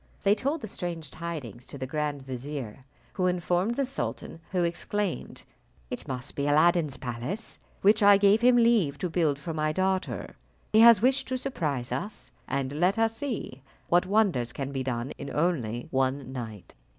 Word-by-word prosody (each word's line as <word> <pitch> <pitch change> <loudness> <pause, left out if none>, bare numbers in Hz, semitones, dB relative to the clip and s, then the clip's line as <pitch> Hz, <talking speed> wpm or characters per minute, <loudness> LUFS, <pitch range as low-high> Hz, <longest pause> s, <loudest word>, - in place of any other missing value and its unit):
They 200 - +5
told 280 +9 -1
the - - -5
strange 170 -6 -5
tidings 150 -8 -6
to - - -8
the 130 - -4
grand 145 0 -2
vizier, 130 -2 -6 0.3
who 185 -1 +1
informed 180 +4 0
the 275 - +1
sultan, 260 -9 -4
who 180 -2 0
exclaimed, 190 +3 -3 0.5
"It - - -5
must 130 +1 -5
be 140 0 -1
Aladdin's 155 -1 +3
palace, 125 - -5 0.2
which 205 +3 +5
I 205 0 +8
gave 200 +2 +4
him 250 +1 +6
leave 225 -12 +3
to 180 +1 -3
build 160 -5 +2
for 165 +3 -5
my 155 0 0
daughter. 190 +2 -1 0.4
He 215 - +6
has 230 -2 +8
wished 265 +1 +3
to 260 - -1
surprise 150 - -2
us, 190 - -4 0.2
and 135 -1 -2
let 180 +7 +2
us 225 0 +2
see 225 - -4 0.3
what 175 +1 +3
wonders 190 - +2
can 135 +2 -4
be 135 -1 -2
done 125 0 -3
in 140 - -6
only 130 -8 0
one 130 0 0
night." 110 -6 -7
165 Hz, 175 wpm, -28 LUFS, 135-205 Hz, 0.5 s, I